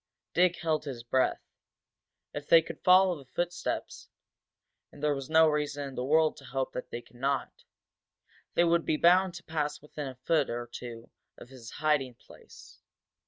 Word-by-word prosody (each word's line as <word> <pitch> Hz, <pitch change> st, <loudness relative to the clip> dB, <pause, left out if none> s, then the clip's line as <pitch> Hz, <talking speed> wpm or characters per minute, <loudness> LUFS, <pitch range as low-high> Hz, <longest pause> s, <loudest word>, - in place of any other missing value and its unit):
Dick 180 Hz, 0 st, +3 dB
held 155 Hz, -2 st, -1 dB
his 125 Hz, -5 st, -6 dB
breath. 130 Hz, +2 st, +1 dB, 0.9 s
If 145 Hz, 0 st, -6 dB
they 165 Hz, -1 st, +7 dB
could -, -, -9 dB
follow 185 Hz, 0 st, +6 dB
the 135 Hz, -4 st, -14 dB
footsteps 175 Hz, 0 st, -3 dB, 0.8 s
and 145 Hz, -, -14 dB
there 150 Hz, -1 st, +3 dB
was 135 Hz, -1 st, -6 dB
no 160 Hz, 0 st, +6 dB
reason 145 Hz, -2 st, -1 dB
in -, -, -11 dB
the 125 Hz, -, -3 dB
world 155 Hz, +3 st, +3 dB
to 135 Hz, -, -13 dB
hope 135 Hz, -1 st, -3 dB
that 125 Hz, -, -6 dB
they 120 Hz, -, -6 dB
could 120 Hz, -, -20 dB
not! 135 Hz, +1 st, -1 dB, 1.0 s
they -, -, +5 dB
would 170 Hz, -1 st, +3 dB
be 155 Hz, -, 0 dB
bound 180 Hz, +2 st, +4 dB
to 175 Hz, -, -9 dB
pass 150 Hz, -2 st, -2 dB
within 150 Hz, -1 st, -7 dB
a 130 Hz, -, -7 dB
foot 145 Hz, +3 st, +1 dB
or 120 Hz, 0 st, -3 dB
two 120 Hz, -1 st, -9 dB, 0.3 s
of 120 Hz, -, -13 dB
his 125 Hz, -3 st, -11 dB
hiding 145 Hz, -5 st, 0 dB
place. -, -, -16 dB
150 Hz, 175 wpm, -29 LUFS, 130-165 Hz, 1.0 s, they